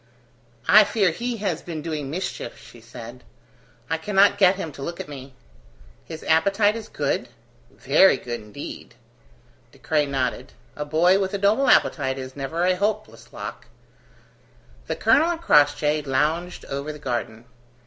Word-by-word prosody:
"I 215 +1 +8
fear 200 -4 +1
he 235 +7 -4
has 190 -6 -2
been 160 -3 -6
doing 150 -4 -4
mischief," 160 -6 -5
she 120 - -15
said. 115 +2 -11 0.6
"I 160 +1 -1
cannot 200 +3 +3
get 190 -1 +5
him 165 -5 -5
to 140 - -12
look 170 +5 -5
at - - -6
me." 135 -2 -10 0.7
"His 160 -1 -9
appetite 200 +6 +3
is 225 -2 -7
good?" - - -2 0.4
"Very 190 -8 +4
good 120 -2 -6
indeed." 105 -1 -9 0.8
De - - -20
Craye 150 -2 0
nodded. 130 -3 -3 0.2
A 150 - -4
boy 170 +6 +3
with 195 0 -2
a - - 0
noble 210 +7 +2
appetite 135 -3 +3
is 130 0 -7
never 145 +5 -3
a 185 0 +3
hopeless 205 +3 -3
lock. - - -8 1.2
The - - -2
colonel 330 - +3
and 345 -1 -2
Crossjay 150 - +3
lounged 155 +6 -1
over 140 +2 -4
the 150 - -9
garden. 120 -4 -4
160 Hz, 155 wpm, -23 LUFS, 135-195 Hz, 1.2 s, I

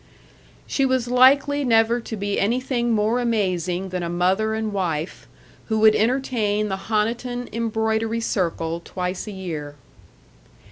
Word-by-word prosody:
She 275 - 0
was 260 -2 +1
likely 275 +3 +4
never 230 -1 +3
to 225 - -6
be 200 0 -2
anything 240 +3 0
more 220 +2 +1
amazing 190 -6 -1
than 180 -1 -3
a 170 - -3
mother 190 +5 +1
and 220 -1 -3
wife, 170 -4 -3 0.4
who 220 - 0
would 220 -1 +7
entertain 220 -3 0
the 195 0 -5
Honiton 240 +3 -1
Embroidery 225 0 -1
Circle 170 -5 -1
twice 180 +3 -4
a - - -5
year. 160 -7 -6
220 Hz, 135 wpm, -23 LUFS, 190-240 Hz, 0.4 s, would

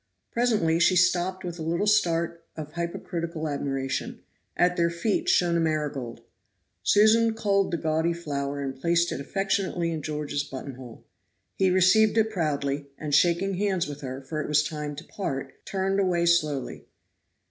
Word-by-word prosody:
Presently 215 -9 +2
she 185 +2 +4
stopped 185 +1 +2
with 175 -1 -6
a - - -5
little 170 +5 0
start 170 -5 +1
of 155 -1 -7
hypocritical 170 -1 -4
admiration; 135 -2 -3 0.3
at 180 0 +3
their 170 -1 +2
feet 220 - -1
shone 175 - +3
a - - +2
marigold. 150 -7 -2 0.6
Susan 220 +2 +4
culled 200 -3 +1
the 170 - -1
gaudy 160 +1 0
flower 140 -4 -3
and 135 -1 -4
placed 170 +1 +2
it - - -3
affectionately 190 0 -1
in 160 -2 -3
George's 150 -1 -3
buttonhole. 130 -3 -9 0.5
He 190 -1 +2
received 190 +5 +4
it 220 0 +3
proudly, 145 -6 -1
and 150 -1 -5
shaking 175 +5 +3
hands 190 -3 0
with 145 -1 -7
her, 130 0 -6
for 155 +3 -4
it - - -4
was 150 0 +3
time 150 -1 -4
to 150 - -8
part, 135 -10 -5
turned 195 0 0
away 180 -3 +2
slowly. 155 -6 0
170 Hz, 160 wpm, -26 LUFS, 150-185 Hz, 0.6 s, she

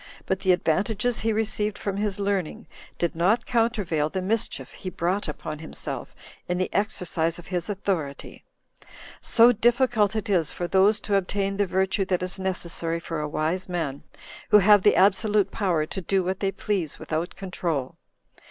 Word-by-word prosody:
But 190 - -1
the 190 - +3
advantages 210 +7 +1
he 225 - 0
received 215 -1 -1
from 200 -1 -3
his 205 -1 -2
learning 200 -4 -2 0.3
did 170 -2 -1
not 190 +8 +2
countervail 205 -10 +1
the 190 - -3
mischief 215 +3 -2
he 185 - -7
brought 180 +3 -1
upon 150 0 -6
himself 160 - -5 0.3
in 180 - -1
the 185 - -2
exercise 170 -5 -1
of 175 - -11
his 180 +1 -3
authority; 185 -8 -3 0.8
so 235 +1 +6
difficult 235 -2 +2
it 215 - -2
is 175 -7 +2
for 175 - -4
those 195 +4 +4
to 205 - -3
obtain 195 +1 -1
the 205 -1 +1
virtue 190 +2 +1
that 180 -1 0
is 185 +1 -1
necessary 170 -3 -2
for 165 -1 -5
a 150 - -3
wise 165 +5 -2
man, 160 -6 -3 0.5
who - - +8
have 205 0 +6
the 205 - +4
absolute 200 +1 +3
power 175 -7 0
to 190 - -5
do 190 +2 +1
what 185 +1 -2
they 195 -1 0
please 195 -5 -2
without 165 +3 -3
control. 170 -8 -3
190 Hz, 170 wpm, -25 LUFS, 170-205 Hz, 0.8 s, who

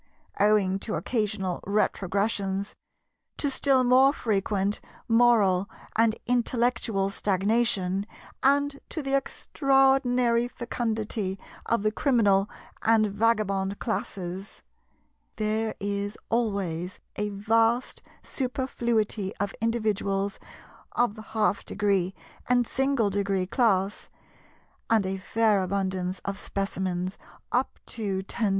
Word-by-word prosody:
Owing 200 -2 +3
to 215 - -3
occasional 210 -6 -1
retrogressions, 200 0 0 0.6
to 285 - 0
still 265 -1 +3
more 255 +2 +6
frequent 205 -5 0 0.3
moral 225 -5 +4 0.3
and 225 0 +3
intellectual 235 -4 +1
stagnation, 200 -1 +1 0.3
and 280 +1 +2
to 310 - -4
the 275 0 +1
extraordinary 265 -3 +2
fecundity 225 -5 -3 0.3
of 230 -3 +1
the 215 - +2
Criminal 210 -6 +3 0.3
and 220 -2 +3
Vagabond 200 -3 +1
classes, 190 -4 -4 0.7
there 220 0 -1
is 200 +1 -3
always 195 -6 -1 0.2
a 210 0 -1
vast 225 +4 +1 0.2
superfluity 235 -6 -1
of 205 -1 -2
individuals 205 -3 0 0.5
of 240 -3 +2
the 215 - -10 0.2
half 210 -1 +2
degree 195 -2 0 0.3
and 245 -1 +4
single 265 -5 +1
degree 195 -1 0
class, 200 -2 +1 0.8
and 220 -3 +3
a 190 +1 -2
fair 215 0 +2
abundance 185 -1 -1
of 200 0 -3
Specimens 190 -2 -3 0.3
up 250 +2 0
to 195 -4 -3
10°. 215 +2 -1
210 Hz, 100 wpm, -27 LUFS, 195-235 Hz, 0.8 s, more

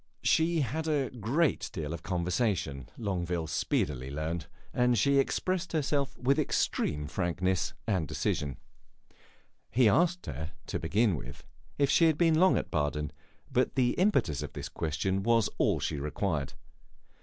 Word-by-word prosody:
She 160 0 +3
had 155 +5 -2
a 145 -4 0
great 130 +7 0
deal 80 -2 -4
of 85 - -6
conversation, 90 - -1
Longueville 90 -6 -2
speedily 70 -3 -1
learned, 80 +3 -3 0.3
and 125 -1 +3
she 140 +5 +4
expressed 175 +4 -1
herself 140 -3 0
with 135 +2 +2
extreme 75 0 0
frankness 90 +4 -1
and 95 -8 0
decision. 70 -3 -2 1.1
He 125 -1 +4
asked 175 - +3
her, 80 +6 -5
to - - -3
begin 100 +4 +2
with, 70 - -8 0.3
if 140 -1 +3
she 165 - +5
had 160 -2 +3
been 165 -2 +4
long 185 +1 +5
at - - -3
Baden, 75 0 -1 0.4
but - - +1
the 125 -2 +3
impetus 135 - +1
of - - -6
this - - -6
question 90 +5 -1
was 115 +1 +2
all - - +3
she 75 - -2
required. 75 -1 -2
100 Hz, 145 wpm, -30 LUFS, -, 1.1 s, she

